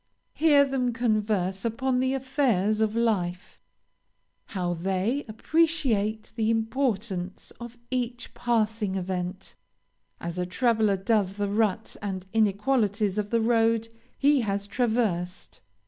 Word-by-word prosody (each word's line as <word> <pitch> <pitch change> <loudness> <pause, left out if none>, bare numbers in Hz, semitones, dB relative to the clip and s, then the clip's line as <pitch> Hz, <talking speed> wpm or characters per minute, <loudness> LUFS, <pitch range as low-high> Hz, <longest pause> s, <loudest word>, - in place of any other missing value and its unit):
Hear 290 -3 +5
them 255 -3 -1
converse 210 -5 0
upon 250 +3 0
the 260 +1 +1
affairs 250 -6 +1
of 220 0 +1
life; 185 -6 -1 0.8
how 180 -4 -2
they 190 - -1
appreciate 225 -5 0
the 220 -1 +1
importance 225 -5 -1
of 240 0 -9
each 245 -1 -3
passing 220 -4 0
event, 185 0 -4 0.7
as 170 +1 -5
a 180 - 0
traveler 220 -1 +2
does 195 -1 +1
the 205 0 -2
ruts 215 0 0
and 190 -2 -5
inequalities 210 -1 +1
of 205 -1 -2
the 230 0 +2
road 225 0 +2 0.3
he 285 -1 +4
has 200 -2 -1
traversed. 205 -6 -1
220 Hz, 115 wpm, -27 LUFS, 195-240 Hz, 0.8 s, Hear